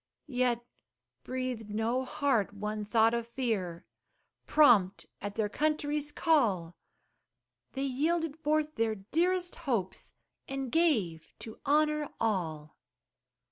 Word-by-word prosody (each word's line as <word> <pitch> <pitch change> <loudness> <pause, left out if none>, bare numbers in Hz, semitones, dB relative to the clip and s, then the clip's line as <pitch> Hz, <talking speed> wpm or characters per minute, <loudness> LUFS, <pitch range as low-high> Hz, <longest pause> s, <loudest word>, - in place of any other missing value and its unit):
Yet 245 -4 0 0.6
breathed 255 -4 -4
no 225 +5 0
heart 250 -7 0
one 210 +1 -3
thought 225 +2 +3
of 235 -1 -2
fear, 215 -9 -2 0.6
Prompt 200 - +5 0.2
at 205 0 -5
their 220 -2 +1
country's 295 +3 -1
call, 215 - +2 1.0
They 270 - -2
yielded 305 +4 0
forth 305 0 0
their 225 -1 +1
dearest 350 - 0
hopes, 195 -7 -2 0.3
And 270 -2 -4
gave 215 - +1
to 220 - -9
honor 300 0 +2
all! 160 -9 -2
240 Hz, 105 wpm, -30 LUFS, 210-295 Hz, 1.0 s, Prompt